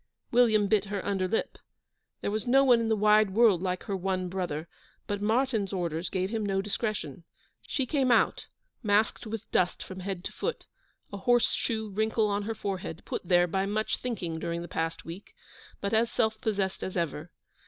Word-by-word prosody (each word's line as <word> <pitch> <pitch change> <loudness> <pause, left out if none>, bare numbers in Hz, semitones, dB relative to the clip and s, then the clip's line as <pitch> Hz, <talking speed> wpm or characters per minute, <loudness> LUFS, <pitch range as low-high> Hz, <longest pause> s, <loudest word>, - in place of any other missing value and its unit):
William 220 -4 +4
bit 210 -1 +2
her 200 -1 -4
under 195 -2 0
lip. 225 - -2 0.6
There - - -1
was 215 +2 -2
no 270 +3 +6
one 245 -3 +6
in 230 -1 0
the 220 - +3
wide 210 0 +5
world 220 -6 +5
like 185 -1 -2
her 200 - -3
one 185 -1 -1
brother, 175 -4 -3 0.4
but 205 -1 -3
Martyn's 220 -1 +1
orders 170 -3 -2
gave 185 +1 -1
him 225 -2 -1
no 195 -1 0
discretion. 200 - -3 0.4
She 270 - -1
came 260 -1 +1
out, - - +3 0.3
masked 215 +1 +1
with 220 0 -6
dust 180 -1 +1
from 185 0 -8
head 185 -1 -4
to - - -4
foot, 480 - -3 0.5
a - - -3
horse 240 +4 +3
shoe 220 -2 -2
wrinkle 220 +2 +1
on 200 0 0
her 225 +1 -3
forehead, 190 -5 -4
put - - -3
here 175 -1 +5
by 190 +3 -1
much 215 +2 0
thinking 180 -10 -4
during 170 0 -3
the - - -7
past 165 -1 -3
week, 170 +5 -9 0.5
but 200 +1 -2
as 230 +1 +3
self 220 -1 0
possessed 200 -3 -1
as 185 - -4
ever. 165 -1 -2
200 Hz, 190 wpm, -29 LUFS, 185-220 Hz, 0.6 s, no